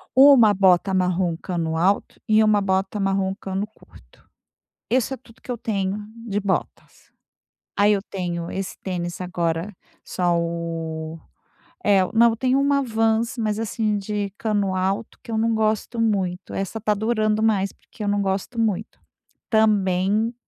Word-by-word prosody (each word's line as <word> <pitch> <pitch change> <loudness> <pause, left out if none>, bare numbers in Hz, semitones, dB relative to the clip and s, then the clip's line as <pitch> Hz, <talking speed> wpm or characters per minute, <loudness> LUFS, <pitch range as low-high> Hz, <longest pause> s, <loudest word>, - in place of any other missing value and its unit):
uma 260 -5 +8
bota 190 0 +4
marrom 180 -2 +1
cano 165 -3 -3
alto 190 +5 +1
e 220 0 +5
uma 210 -1 +3
bota 190 +1 0
marrom 195 -1 0
cano 195 +2 -3
curto. - - -21 0.6
Isso 255 +2 +1
é - - -5
tudo 230 -3 -20
que - - -7
eu 245 - -3
tenho 200 -3 -2 0.3
de 205 -1 -1
botas. 200 -1 -4 0.7
Aí 205 +1 +5
eu 200 - 0
tenho 175 -4 -4
esse 195 0 -4
tênis 175 -2 -4
agora 175 +1 -2 0.3
só 175 -1 0
o 165 -1 -4 0.7
eh, 195 -2 +5
eu 185 - -3
não, 235 +1 +6
eu 225 - -3
tenho 260 +3 +2
uma 280 0 +2
Vans, 225 +1 +1
mas 215 -2 -1
assim, 220 -1 -1
de 205 0 -3
cano 205 -3 0
alto, 195 +4 -2
que - - -11
eu 225 - -1
não 225 +1 +2
gosto 220 +2 0
muito. 195 -4 -1
Essa 195 +3 -3
tá 210 0 +1
durando 215 0 0
mais, 200 -3 +2
porque 215 - -10
eu - - -1
não 205 0 +1
gosto 195 +5 -2
muito. 215 -2 -2 0.5
Também 210 0 +2
200 Hz, 160 wpm, -23 LUFS, 185-220 Hz, 0.7 s, uma